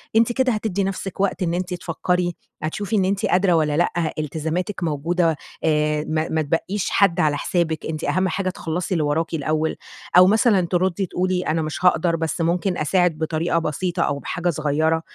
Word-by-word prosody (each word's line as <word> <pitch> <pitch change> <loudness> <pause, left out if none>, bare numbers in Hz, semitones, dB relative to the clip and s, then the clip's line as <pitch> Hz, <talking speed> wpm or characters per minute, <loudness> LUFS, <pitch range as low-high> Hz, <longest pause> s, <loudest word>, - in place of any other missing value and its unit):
أنتِ 230 +1 +4
كده 260 +1 +2
هتّدي 210 -2 -1
نفسِك 195 0 -4
وقت 195 -1 0
إن 170 -1 0
أنتِ 180 +1 -2
تفكري، 175 0 -1 0.3
هتشوفي 200 +7 -2
إن 195 -3 +3
أنتِ 195 +1 0
قادرة 180 0 +3
والَّا 150 -3 +2
لأ، 170 -1 0
إلتزاماتِك 160 +6 -3
موجودة 165 +2 +1 0.3
آآ 150 -1 +1
ما 155 0 -1
ما 160 - 0
تبَقِّيش 165 +6 -1
حد 190 -3 +3
على 150 -3 +2
حسابِك، 160 -2 -1
أنتِ 155 0 -4
أهم 185 +6 +1
حاجة 185 0 -1
تخلّصي 180 +1 -3
اللي 165 -4 +1
وراكِ 160 +3 -1
الأول. 155 +1 0 0.4
أو 180 0 +9
مثلًا 210 -3 +3
تردي 185 +1 +1
تقولي 180 +1 -1
أنا 160 +1 +1
مش 155 +3 -4
هاقدر 180 -1 +3
بس 165 +1 -2
ممكن 175 +2 0
أساعد 175 +1 +2
بطريقة 160 +1 0
بسيطة 170 +2 -1
أو 140 0 -1
بحاجة 175 +4 -2
صغيرة. 155 +1 +1
170 Hz, 180 wpm, -22 LUFS, 155-185 Hz, 0.4 s, أو